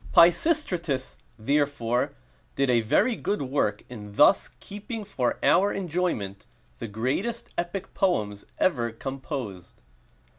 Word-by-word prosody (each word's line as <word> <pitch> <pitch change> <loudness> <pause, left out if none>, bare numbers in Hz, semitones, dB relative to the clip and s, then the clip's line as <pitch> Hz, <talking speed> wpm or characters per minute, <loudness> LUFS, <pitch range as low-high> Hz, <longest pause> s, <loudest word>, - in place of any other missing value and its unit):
Pisistratus, 170 - +3 0.2
therefore, 130 -1 0 0.4
did 135 -2 +2
a 120 -1 +4
very 215 - +2
good 205 -8 -2
work 130 -6 0
in 105 -4 -9
thus - - +5
keeping 210 +2 -7
for 130 -11 -1
our 195 +4 +4
enjoyment 160 - -2 0.3
the 115 - -4
greatest 130 - -2
epic 175 +2 -4
poems 105 - 0
ever 120 -10 +1
composed. 130 - -6
140 Hz, 110 wpm, -26 LUFS, 115-185 Hz, 0.4 s, thus